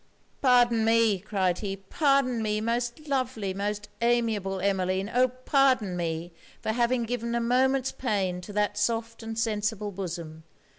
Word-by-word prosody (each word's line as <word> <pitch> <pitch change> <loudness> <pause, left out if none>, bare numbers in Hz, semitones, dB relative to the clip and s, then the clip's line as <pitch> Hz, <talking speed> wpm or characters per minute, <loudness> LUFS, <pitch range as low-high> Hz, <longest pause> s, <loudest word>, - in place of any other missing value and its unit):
'Pardon 245 -3 +4
me,' 225 -3 +3
cried 190 -3 0
he, 195 -2 -3
'pardon 255 +3 +1
me, 215 -1 0
most 240 +6 -2
lovely, 255 -8 -1
most 205 +1 -3
amiable 225 -5 +1
Emmeline! 190 +1 0
oh! 250 +1 +4
pardon 255 - +2
me 170 0 -3 0.3
for - - -2
having 240 +1 +1
given 235 0 -2
a - - +2
moment's 260 +2 +2
pain 195 -7 -1
to 195 - -9
that 210 0 0
soft 230 0 -1
and 225 0 -6
sensible 210 -2 -1
bosom. 170 -4 -6
220 Hz, 145 wpm, -27 LUFS, 195-245 Hz, 0.3 s, Pardon